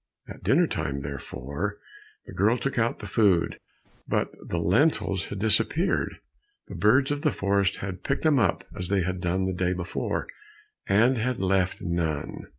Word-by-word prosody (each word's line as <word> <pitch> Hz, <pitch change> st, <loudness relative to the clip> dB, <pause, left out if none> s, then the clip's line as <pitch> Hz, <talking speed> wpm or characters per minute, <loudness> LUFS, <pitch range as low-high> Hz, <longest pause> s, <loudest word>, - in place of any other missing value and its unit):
At -, -, -10 dB
dinner -, -, +4 dB
time, 70 Hz, 0 st, -3 dB
therefore, 70 Hz, 0 st, -5 dB, 0.5 s
the -, -, -10 dB
girl 105 Hz, +7 st, +3 dB
took 130 Hz, +1 st, -2 dB
out 115 Hz, +1 st, +1 dB
the 105 Hz, -, -9 dB
food, 95 Hz, -4 st, +2 dB, 0.5 s
but -, -, 0 dB
the 85 Hz, -, -3 dB
lentils 100 Hz, -, +2 dB
had 105 Hz, -, -6 dB
disappeared. 110 Hz, -, +1 dB, 0.5 s
The -, -, -10 dB
birds 110 Hz, +10 st, +3 dB
of 145 Hz, 0 st, -1 dB
the -, -, +2 dB
forest 100 Hz, 0 st, +1 dB
had 95 Hz, -1 st, -6 dB
picked 140 Hz, -, -1 dB
them 155 Hz, -4 st, +4 dB
up 100 Hz, -6 st, +1 dB
as 90 Hz, -, -4 dB
they 100 Hz, -2 st, +2 dB
had 90 Hz, 0 st, -3 dB
done 95 Hz, +1 st, 0 dB
the 95 Hz, -, -1 dB
day 90 Hz, 0 st, 0 dB
before, 90 Hz, -1 st, -3 dB, 0.6 s
and 115 Hz, +6 st, +4 dB
had 125 Hz, +2 st, 0 dB
left 95 Hz, -1 st, +1 dB
none. 80 Hz, -4 st, -2 dB
95 Hz, 165 wpm, -26 LUFS, 90-115 Hz, 0.6 s, dinner